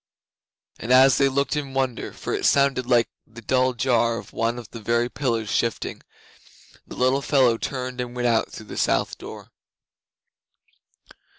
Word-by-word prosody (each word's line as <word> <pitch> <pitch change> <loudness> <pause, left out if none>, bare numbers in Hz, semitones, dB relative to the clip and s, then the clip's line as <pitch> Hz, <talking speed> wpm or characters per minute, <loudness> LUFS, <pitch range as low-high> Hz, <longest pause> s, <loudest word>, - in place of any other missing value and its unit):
As 130 +2 +5
they 140 -1 +4
looked 140 +2 0
in 140 -3 -4
wonder, 130 -3 -2
for - - -5
it - - +1
sounded 135 -3 +2
like 120 -2 +3 0.2
the 115 +1 -13
dull 130 +2 +2
jar 115 -1 +1
of - - -10
one 115 +1 -1
of 120 -3 -8
the 115 - -8
very 120 +2 0
pillars 115 -7 -2
shifting, 115 +1 -2 0.9
the - - -9
little 130 +2 +2
fellow 130 -4 +3
turned 125 -1 -4
and 125 0 -6
went 120 0 0
out 115 -2 +1
through 110 - -10
the - - -9
south - - 0
door. - - -10
125 Hz, 160 wpm, -23 LUFS, 115-130 Hz, 0.9 s, As